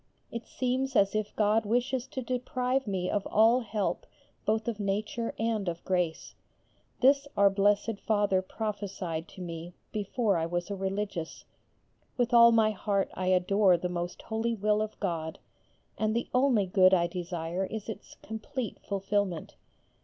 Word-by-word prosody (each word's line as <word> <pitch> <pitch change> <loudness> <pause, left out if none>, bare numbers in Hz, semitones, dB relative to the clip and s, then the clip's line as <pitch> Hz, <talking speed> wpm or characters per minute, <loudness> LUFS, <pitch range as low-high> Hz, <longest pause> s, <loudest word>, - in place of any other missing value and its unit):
It 235 0 -6
seems 260 +1 -1
as 195 -2 +4
if 215 -1 -2
God 215 +1 +3
wishes 245 +4 0
to 260 -1 -5
deprive 255 +1 -1
me 185 -3 -1
of 205 0 -1
all 225 +4 +5
help 215 -4 -2 0.4
both 220 +1 0
of 225 -3 -2
nature 210 +3 -2
and 220 -4 0
of 170 0 -7
grace. 180 -4 -1 0.7
This 280 +2 +5
our 200 0 +6
Blessed 205 +2 +2
Father 205 -3 +3
prophecied 190 -5 -4
to 185 - -12
me 170 0 -6 0.2
before 210 -1 0
I 165 0 0
was 175 +3 -3
a - - -1
Religious. 195 -3 -4 0.7
With 245 -1 +1
all 235 0 +9
my 220 -1 +4
heart 200 -1 -1
I 185 - -3
adore 185 +1 +4
the 180 +1 -3
most 175 0 -4
holy 225 +1 -1
will 210 0 +1
of 215 0 -4
God, 165 -5 -2 0.6
and 215 0 +1
the 235 - -1
only 250 -5 +3
good 185 0 +5
I 170 -1 +2
desire 175 0 -3
is 220 +1 -6
its 220 - -8
complete 220 +2 -5
fulfilment. 195 -3 -2
205 Hz, 155 wpm, -29 LUFS, 185-225 Hz, 0.7 s, all